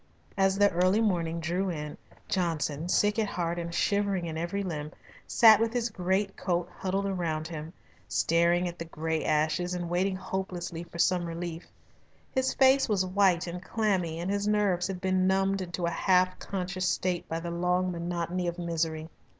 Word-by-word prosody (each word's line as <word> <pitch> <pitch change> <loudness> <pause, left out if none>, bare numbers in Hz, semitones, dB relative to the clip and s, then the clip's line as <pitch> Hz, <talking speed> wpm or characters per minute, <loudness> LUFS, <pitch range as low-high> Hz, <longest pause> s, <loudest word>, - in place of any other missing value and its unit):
As 195 0 +2
the 205 0 +5
early 185 +4 +3
morning 170 -6 0
drew 175 +4 -1
in, 150 -3 -5 0.3
Johnson, 165 -3 -1
sick 210 +3 +2
at 215 - +1
heart 175 -2 -2
and 170 0 -4
shivering 200 0 +1
in 160 -1 -4
every 175 +5 -2
limb, 155 -5 -4 0.4
sat 220 -3 +7
with 225 0 0
his 240 -1 -1
great 190 +1 0
coat 175 -2 -1
huddled 195 +1 -1
round 160 -3 -2
him, 160 -1 -7 0.4
staring 170 +5 +2
at 175 0 -7
the 165 - -4
grey 160 0 -2
ashes 155 +4 +1
and 175 -1 -4
waiting 185 +2 +1
hopelessly 185 -2 -4
for 170 - -11
some 180 +1 +2
relief. 170 0 -5 0.6
His 260 0 +1
face 265 -1 +5
was 195 -3 +2
white 185 -2 +3
and 175 0 -6
clammy, 185 -7 0
and 180 +3 -2
his 200 0 -1
nerves 200 -4 +2
had 190 -2 -5
been 185 -1 +2
numbed 195 0 +2
into 175 -1 -3
a 170 - 0
half 185 0 +2
conscious 185 -1 -2
state 180 -1 -1
by 165 - -2
the 170 0 -5
long 180 +1 +1
monotony 175 +1 -2
of 170 0 -3
misery. 165 -2 -2
180 Hz, 175 wpm, -29 LUFS, 170-195 Hz, 0.6 s, sat